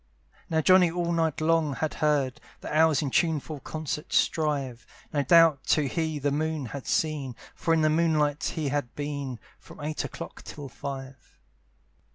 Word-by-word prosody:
Now 160 Hz, -1 st, +2 dB
Johnny 185 Hz, +1 st, +6 dB
all 170 Hz, 0 st, -1 dB
night 160 Hz, -2 st, 0 dB
long 160 Hz, -3 st, +2 dB
had 155 Hz, +2 st, -2 dB
heard 145 Hz, -4 st, +1 dB, 0.2 s
The -, -, -5 dB
owls 155 Hz, -2 st, +4 dB
in 140 Hz, -, -2 dB
tuneful 155 Hz, -2 st, 0 dB
concert 155 Hz, +3 st, -5 dB
strive; 140 Hz, -6 st, 0 dB, 0.3 s
No 145 Hz, -, +2 dB
doubt 160 Hz, -1 st, +5 dB
too 155 Hz, -, +3 dB
he 160 Hz, +3 st, -1 dB
the 145 Hz, 0 st, 0 dB
moon 155 Hz, 0 st, -1 dB
had 135 Hz, +3 st, -7 dB
seen; 145 Hz, -6 st, 0 dB, 0.2 s
For 165 Hz, -, -2 dB
in 165 Hz, -1 st, +4 dB
the 155 Hz, -, +4 dB
moonlight 155 Hz, -2 st, +2 dB
he 155 Hz, -3 st, -1 dB
had 145 Hz, -3 st, -2 dB
been 140 Hz, -3 st, -4 dB, 0.2 s
From 95 Hz, -, -14 dB
eight 150 Hz, +1 st, -3 dB
o'clock -, -, -7 dB
till 145 Hz, -2 st, -8 dB
five. 135 Hz, 0 st, -8 dB
150 Hz, 165 wpm, -27 LUFS, 140-160 Hz, 0.3 s, Johnny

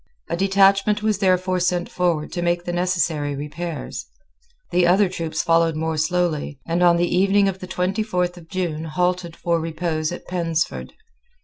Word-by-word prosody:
A -, -, +1 dB
detachment 195 Hz, +2 st, +3 dB
was 215 Hz, -2 st, +1 dB
therefore 185 Hz, -1 st, +2 dB
sent 180 Hz, 0 st, 0 dB
forward 170 Hz, -4 st, -1 dB
to 175 Hz, -, -3 dB
make 175 Hz, 0 st, 0 dB
the 175 Hz, -, -3 dB
necessary 170 Hz, -5 st, 0 dB
repairs. 150 Hz, +3 st, -5 dB, 0.6 s
The 175 Hz, -1 st, +3 dB
other 190 Hz, +3 st, +4 dB
troops 165 Hz, -3 st, -3 dB
followed 165 Hz, -1 st, +3 dB
more 160 Hz, +1 st, -1 dB
slowly, 155 Hz, -3 st, -1 dB
and 170 Hz, +1 st, -1 dB
on 175 Hz, -1 st, +5 dB
the 175 Hz, +1 st, +1 dB
evening 195 Hz, +2 st, +4 dB
of 190 Hz, -1 st, -2 dB
the 185 Hz, -, -8 dB
twenty 190 Hz, +3 st, -1 dB
fourth 180 Hz, -4 st, -1 dB
of 165 Hz, -2 st, -14 dB
June 165 Hz, -4 st, -2 dB
halted 180 Hz, +1 st, -1 dB
for 170 Hz, -1 st, 0 dB
repose 160 Hz, -1 st, -2 dB
at 175 Hz, -, -7 dB
Pensford. 170 Hz, -2 st, -2 dB
175 Hz, 170 wpm, -22 LUFS, 165-185 Hz, 0.6 s, on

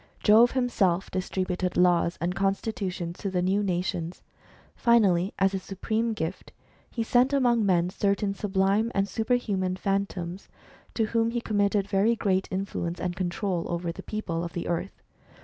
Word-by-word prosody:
Jove 225 Hz, +3 st, +6 dB
himself 200 Hz, -8 st, +1 dB
dis 185 Hz, 0 st, -3 dB
tributed 185 Hz, -1 st, -2 dB
laws 175 Hz, -1 st, +3 dB
and 170 Hz, +2 st, -1 dB
constitutions 195 Hz, -3 st, -2 dB
to 200 Hz, -, -2 dB
the 180 Hz, -1 st, 0 dB
new 195 Hz, +3 st, +2 dB
nations. 180 Hz, -3 st, -2 dB, 0.5 s
Finally, 200 Hz, -6 st, +3 dB
as 195 Hz, 0 st, +2 dB
a 195 Hz, -, -1 dB
supreme 220 Hz, +5 st, -2 dB
gift, 170 Hz, -2 st, -5 dB, 0.4 s
he 230 Hz, -, -2 dB
sent 250 Hz, +4 st, +3 dB
among 240 Hz, -5 st, +3 dB
men 180 Hz, -2 st, +2 dB
certain 200 Hz, 0 st, 0 dB
sublime 200 Hz, +3 st, +1 dB
and 195 Hz, 0 st, +2 dB
superhuman 205 Hz, -4 st, 0 dB
Phantoms, 195 Hz, -2 st, -3 dB, 0.5 s
to 225 Hz, -, +2 dB
whom 230 Hz, +1 st, +1 dB
he 240 Hz, +1 st, -1 dB
com 215 Hz, -3 st, -3 dB
mitted 200 Hz, -1 st, +2 dB
very 205 Hz, +4 st, +2 dB
great 190 Hz, -4 st, 0 dB
influence 185 Hz, -2 st, -3 dB
and 175 Hz, -1 st, -2 dB
control 180 Hz, 0 st, -2 dB
over 170 Hz, 0 st, -2 dB
the -, -, -9 dB
people 175 Hz, -6 st, -3 dB
of 170 Hz, -, -6 dB
the 170 Hz, -, -4 dB
earth. 175 Hz, +3 st, -3 dB
195 Hz, 160 wpm, -27 LUFS, 180-215 Hz, 0.5 s, Jove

